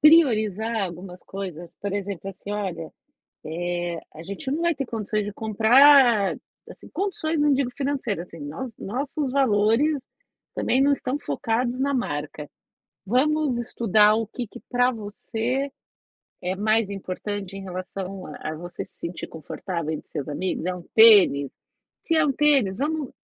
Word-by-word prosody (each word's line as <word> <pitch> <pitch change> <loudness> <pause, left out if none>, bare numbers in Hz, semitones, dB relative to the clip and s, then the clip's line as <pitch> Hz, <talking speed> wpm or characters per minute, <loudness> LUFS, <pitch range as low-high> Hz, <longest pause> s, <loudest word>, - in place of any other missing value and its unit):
priorizar 230 - +4
algumas 180 +1 -8
coisas, 180 -4 -7
por 200 -1 -3
exemplo, 200 -1 -4
assim 195 +2 -10
olha: 185 - -4 1.0
"Eh, 170 - -4 0.2
a 160 - -9
gente 200 +8 -6
não 320 +4 -1
vai 340 -1 +2
ter 275 -1 -3
condições 215 -2 -2
de 205 - -5
comprar" 230 0 +5 0.3
assim, - - -14
condições 335 -5 -1
não 295 -1 +4
digo 270 -2 +1
financeira 270 - -2
assim, 165 -2 -13
nós 165 - -6
nossos 270 +5 -3
valores 260 +3 +3 0.5
também 260 - +2
não 285 +1 +5
estão 275 +1 -2
focados 240 - -1
na 280 +1 +1
marca. 150 - -3 0.6
"Vamos 280 +3 +2
estudar 215 -3 +4
o 225 -1 -1
que 240 0 -6
que 245 - -11
pra 245 0 +3
você 230 +5 -3 0.7
é 185 +1 -1
mais 215 0 +2
importante 195 0 -5
em 195 - -7
relação 185 +1 -6
a 155 +1 -6
a - - -5
você 175 +2 -6
se - - -21
sentir 170 +1 -5
confortável 160 +1 -5
entre 155 - -7
seus 145 -3 -4
amigos, 180 +3 -2
é 185 - 0
um 180 - -8
tênis? 200 - +7 0.5
Se 330 - 0
é 315 - +4
um 275 - +2
tênis, 270 -9 +3
vamos 300 -1 -1
215 Hz, 155 wpm, -24 LUFS, 185-270 Hz, 1.0 s, tênis